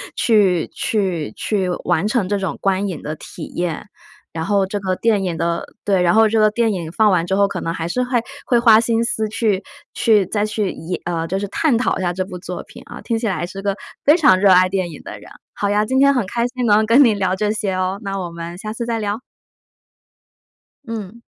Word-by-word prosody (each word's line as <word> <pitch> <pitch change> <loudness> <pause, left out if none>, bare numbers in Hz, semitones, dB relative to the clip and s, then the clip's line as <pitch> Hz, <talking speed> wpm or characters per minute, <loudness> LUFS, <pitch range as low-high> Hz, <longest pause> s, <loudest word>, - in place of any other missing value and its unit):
去 195 -7 +3
去 180 - -1
去 195 -4 -1
完 185 +6 +1
成 220 -4 0
这 205 - +1
种 185 -6 -3
观 195 +1 +1
影 175 -5 -5
的 150 - -4
体 - - -10
验。 175 +2 -3 0.4
然 160 -1 -4
后 200 +1 +2
这 195 +2 -4
个 185 -1 -1
电 215 -4 +1
影 170 -3 -2
的 170 +1 -1 0.2
对， 195 -3 +2
然 175 -1 +3
后 220 0 +5
这 220 +1 0
个 215 -1 +4
电 230 +1 +1
影 165 -3 -5
放 215 +3 +3
完 175 -3 +2
之 190 - -2
后， 200 0 +4
可 - - -5
能 165 - -2
还 165 0 -4
是 250 +8 -1
会 245 -2 0 0.2
会 240 -2 +3
花 225 -2 +6
心 230 -1 +1
思 220 -2 -1
去 215 -3 0 0.3
去 215 -4 +3
再 205 +3 -1
去 210 -2 -2
也 175 +3 -5
呃， 165 -2 -2
就 190 +4 -2
是 205 - -3
探 270 +3 +1
讨 240 - 0
一 - - -4
下 175 -1 0
这 185 +1 -3
部 180 -1 -8
作 175 - -6
品 - - -14
啊， - - -10
听 230 -2 -2
起 225 - -2
来 175 -2 -2
是 195 +2 -8
个 200 0 -1 0.3
非 300 +4 +5
常 190 - +5
热 195 0 +4
爱 185 0 +6
电 185 -3 -2
影 150 - -10
的 105 -1 -9
人。 - - -14 0.2
好 205 - -2
呀， 210 +1 +2
今 260 +3 0
天 280 0 +5
很 250 -6 0
开 235 +4 -1
心 250 0 -3
能 215 0 +4
跟 230 +5 +5
你 225 - +4
聊 190 -2 0
这 210 +2 -1
些 210 -2 -1
哦， 185 +1 -1
那 195 -1 -3
我 175 -2 -4
们 170 +1 -7
下 215 +2 -6
次 235 +1 -4
再 230 -1 -2
聊。 210 +3 -3 1.7
嗯。 225 0 -6
200 Hz, 255 characters per minute, -19 LUFS, 180-225 Hz, 1.7 s, 花